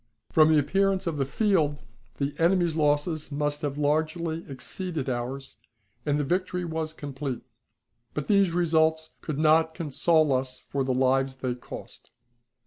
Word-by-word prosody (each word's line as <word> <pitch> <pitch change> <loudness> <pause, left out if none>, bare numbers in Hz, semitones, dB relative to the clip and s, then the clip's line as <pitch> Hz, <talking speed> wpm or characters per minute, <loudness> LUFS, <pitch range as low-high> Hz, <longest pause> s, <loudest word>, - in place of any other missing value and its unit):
From 155 -1 +6
the 155 - +5
appearance 195 +6 +2
of 165 -3 -2
the 135 - +1
field 160 -4 +1 0.4
the 140 0 -1
enemy's 170 -1 +3
losses 150 +1 0
must 145 0 -1
have 145 -1 -3
largely 160 +2 0
exceeded 155 +2 -5
ours, 130 +2 -4 0.5
and 145 0 +2
the - - +1
victory 180 +3 -1
was 160 -1 -3
complete; 140 -4 -5 0.7
but 150 - -2
these 200 -3 +4
results 160 -2 +2
could 155 -3 -4
not 160 +1 +3
console 155 -1 +2
us 130 0 -2
for 140 +1 -3
the 130 - -1
lives 130 +1 +2
they 130 -1 -2
cost. 120 - -10
155 Hz, 145 wpm, -27 LUFS, 140-165 Hz, 0.7 s, From